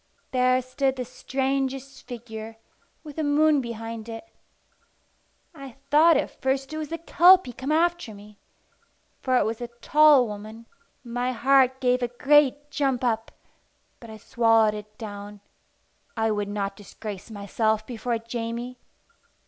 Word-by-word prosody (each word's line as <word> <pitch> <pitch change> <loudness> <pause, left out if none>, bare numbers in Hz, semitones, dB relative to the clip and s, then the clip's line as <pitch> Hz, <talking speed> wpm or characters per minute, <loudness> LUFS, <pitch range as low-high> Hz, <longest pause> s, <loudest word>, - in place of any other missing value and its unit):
There 255 0 +3
stood 265 +1 -1
the 250 -1 -4
strangest 270 +1 -3
figure, 225 -2 -8 0.5
with 300 -2 -11
the 315 - -1
moon 295 0 +3
behind 230 -1 -7
it. 225 +8 -8 1.3
I 275 -6 -11 0.2
thought 315 +2 +6
at - - -4
first 270 +2 -1
it 310 - -4
was 305 -2 -5
the 330 - -4
Kelpie 350 -3 +5
come 265 +5 -4
after 340 -7 0
me, 205 0 -15 0.8
for 255 -1 +2
it - - +2
was 225 +2 -3
a 240 - -4
tall 280 +3 +4
woman. 215 +1 -9 0.4
My 245 +1 -2
heart 260 +1 +3
gave 250 -1 +1
a 245 - 0
great 290 +3 +2
jump 270 -4 0
up, 225 -2 -1 0.7
but 235 - -12
I 220 - -9
swallowed 225 -1 +3
it 210 0 -10
down. 205 -2 -8 0.8
I 225 0 +1
would 205 -1 -2
not 200 -1 -3
disgrace 205 0 -9
myself 215 +1 -1
before 240 0 -3
Jamie. 235 +2 -5
245 Hz, 140 wpm, -25 LUFS, 220-275 Hz, 1.3 s, thought